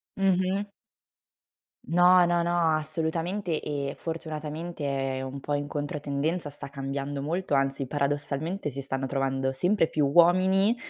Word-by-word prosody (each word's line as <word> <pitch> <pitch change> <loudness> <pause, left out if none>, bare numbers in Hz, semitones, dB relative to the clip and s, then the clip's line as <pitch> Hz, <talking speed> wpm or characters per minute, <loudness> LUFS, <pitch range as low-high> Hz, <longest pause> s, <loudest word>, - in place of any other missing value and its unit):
Mh-mh. 195 +1 +1 1.2
No, 180 +1 +6
no, 175 0 +2
no, 170 -2 +2
assolutamente 165 +3 -2
e 140 -1 -3
fortunatamente 160 0 -5 0.3
è 130 - -3
un 135 +1 -5
po' 145 +2 -3
in 145 0 -1
controtendenza, 145 +2 -2
sta 145 -1 -8
cambiando 140 0 -4
molto, 165 +2 -2
anzi 135 -1 +1
paradossalmente 145 +4 -2
si 135 +2 -5
stanno 135 0 -3
trovando 135 0 -1
sempre 180 +4 +2
più 150 -2 +1
uomini 185 +7 +5
155 Hz, 125 wpm, -27 LUFS, 140-175 Hz, 1.2 s, No